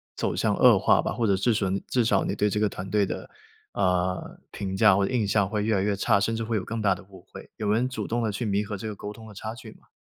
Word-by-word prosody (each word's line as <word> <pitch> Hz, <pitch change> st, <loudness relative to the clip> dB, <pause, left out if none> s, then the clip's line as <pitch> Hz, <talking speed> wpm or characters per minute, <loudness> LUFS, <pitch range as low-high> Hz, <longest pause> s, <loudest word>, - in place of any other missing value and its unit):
走 -, -, -1 dB
向 -, -, +1 dB
恶 -, -, +6 dB
化 -, -, +4 dB
吧， -, -, -2 dB
或 115 Hz, +1 st, 0 dB
者 100 Hz, -, +3 dB
至 115 Hz, +5 st, +1 dB
吮 100 Hz, -2 st, -1 dB
至 125 Hz, -3 st, +1 dB
少 100 Hz, -3 st, +2 dB
你 95 Hz, -, -2 dB
对 105 Hz, 0 st, +1 dB
这 105 Hz, -, -2 dB
个 105 Hz, -1 st, +2 dB
团 95 Hz, 0 st, -7 dB
队 105 Hz, 0 st, +2 dB
的， -, -, -6 dB, 0.4 s
呃， 90 Hz, -1 st, -1 dB
评 95 Hz, -1 st, -4 dB
价 105 Hz, 0 st, +5 dB
或 100 Hz, -, +2 dB
者 130 Hz, -, -4 dB
印 115 Hz, -4 st, +1 dB
象 100 Hz, -2 st, +2 dB
会 105 Hz, 0 st, -1 dB
越 110 Hz, +1 st, +1 dB
来 95 Hz, -, +1 dB
越 100 Hz, +1 st, 0 dB
差， 100 Hz, 0 st, +2 dB
甚 115 Hz, +3 st, 0 dB
至 115 Hz, -, -2 dB
会 110 Hz, 0 st, -1 dB
有 100 Hz, -, -3 dB
更 115 Hz, 0 st, -4 dB
大 100 Hz, -3 st, +3 dB
的 -, -, -12 dB
误 95 Hz, -1 st, -15 dB
会。” -, -, -11 dB
有 105 Hz, -2 st, -2 dB
人 115 Hz, +4 st, +2 dB
主 110 Hz, -5 st, -4 dB
动 120 Hz, +1 st, -1 dB
地 110 Hz, -, 0 dB
去 110 Hz, +4 st, -3 dB
弥 100 Hz, 0 st, +1 dB
合 105 Hz, 0 st, -5 dB
这 95 Hz, -, -8 dB
个 105 Hz, -, -4 dB
沟 105 Hz, +1 st, -7 dB
通 110 Hz, +1 st, -13 dB
的 105 Hz, -, -11 dB
差 110 Hz, +3 st, -6 dB
距 120 Hz, -2 st, -11 dB
吗？ -, -, -24 dB
105 Hz, 330 characters per minute, -26 LUFS, 95-110 Hz, 0.4 s, 恶